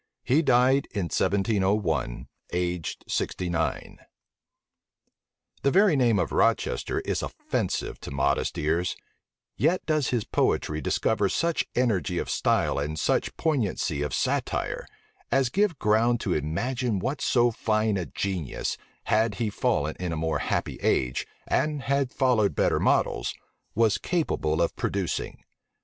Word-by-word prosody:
He 140 +6 +3
died 130 -1 +3
in 100 -7 -3
1701, 95 - 0 0.3
aged 90 -2 -2
sixty 90 -1 -2
nine. 85 -1 -2 1.6
The 140 - +3
very 190 +1 +5
name 120 -5 +3
of - - 0
Rochester - - +1
is - - -2
offensive - - -3
to - - -7
modest 70 0 0
ears, 80 +4 0 0.6
yet 170 +5 +1
does 155 -4 +1
his 120 -4 0
poetry 75 -5 0
discover 100 +7 +1
such 165 - 0
energy 110 - +1
of - - -2
style - - +1
and 75 +2 -3
such - - 0
poignancy 110 - 0
of 75 -1 -2
satire, - - -1 0.4
as 135 -3 +3
give 195 0 +1
ground 115 +2 +2
to 95 - 0
imagine 115 - -1
what 135 +9 -2
so 120 -3 +3
fine 110 -1 0
a 90 -4 -2
genius, 90 -4 -3 0.3
had 110 -1 +2
he 110 0 -1
fallen 75 -5 0
in 90 -1 -2
a 80 - -2
more 80 0 0
happy - - -2
age, 65 0 +1 0.2
and 150 -3 0
had 140 -1 0
followed 125 -6 +2
better - - +2
models, - - +1 0.4
was 115 -2 +3
capable 85 - 0
of 85 - -1
producing. 95 -3 -3
105 Hz, 135 wpm, -26 LUFS, 85-130 Hz, 1.6 s, very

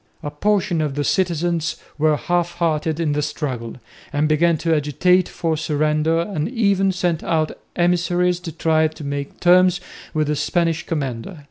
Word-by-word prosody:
A 145 - -4
portion 185 0 +1
of 145 -3 -2
the 145 - -1
citizens 170 -1 0 0.2
were 155 0 +3
half 175 +1 -1
hearted 160 -2 -1
in 160 -3 0
the 145 0 0
struggle, 130 -6 -4 0.4
and 145 +1 +1
began 160 +2 +3
to 165 +1 0
agitate 180 +5 +2
for 165 -2 -1
surrender 155 +1 +1
and 170 -2 -3
even 200 -5 +2
sent 175 -3 -1
out 155 -2 0 0.2
emissaries 175 0 +1
to 175 -2 -7
try 160 0 +2
to 155 0 -10
make 140 0 -5
terms 180 0 +5 0.3
with 155 -1 0
the 150 +1 0
Spanish 165 +2 0
commander. 140 +1 -4
165 Hz, 160 wpm, -21 LUFS, 150-175 Hz, 0.4 s, terms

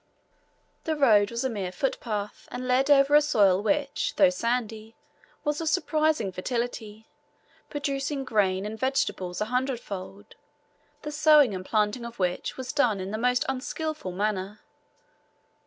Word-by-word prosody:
The 315 - 0
road 215 -8 +4
was 235 +1 -3
a 260 - 0
mere 195 -5 -4
footpath, 210 -1 -4
and 255 0 -5
led 255 +3 +2
over 280 0 +5
a 295 - +8
soil 200 -10 +3
which, 285 +5 -1
though 285 -2 +5
sandy, 230 -4 -3 0.5
was 295 +1 -1
of 325 - 0
surprising 310 - +1
fertility, 220 +1 -4 0.6
producing 280 -1 -2
grain 195 -5 +1
and 220 +1 -6
vegetables 210 -8 -1
a - - +1
hundredfold, 220 -5 -4 0.7
the 300 - -5
sowing 300 -5 +5
and 185 -1 -5
planting 210 +4 0
of 235 0 -8
which 180 -2 -2
was 260 -1 -5
done 235 -8 +2
in 190 +1 -5
the 215 - -3
most 250 +1 +1
unskilful 280 - -4
manner. 200 +1 -3
235 Hz, 140 wpm, -26 LUFS, 205-275 Hz, 0.7 s, a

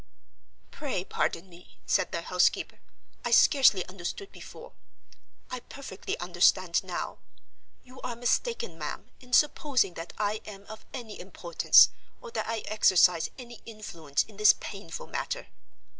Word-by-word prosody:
"Pray 265 -11 -3
pardon 175 -1 -2
me," 175 0 -18
said - - +1
the - - -3
housekeeper, - - +1 0.4
"I - - -1
scarcely 260 - +5
understood 190 - -6
before; - - -12 0.8
I 255 - -3
perfectly 245 -6 -7
understand 175 0 +2
now. 185 -2 -5 0.6
You 255 +1 -14
are 240 - -4
mistaken, 465 - -1
ma'am, - - -6
in 250 -1 -17
supposing 270 - +3
that 165 +1 -8
I 210 0 -1
am 200 -2 -10
of 220 +1 -11
any 235 -5 -8
importance, 175 -2 +5 0.3
or 485 - -10
that - - -3
I 225 -1 -2
exercise 180 -5 +4
any 240 -3 -11
influence 170 -10 -3
in 210 - -17
this 210 0 +7
painful 195 -5 -7
matter. - - -4
210 Hz, 135 wpm, -28 LUFS, 180-250 Hz, 0.8 s, this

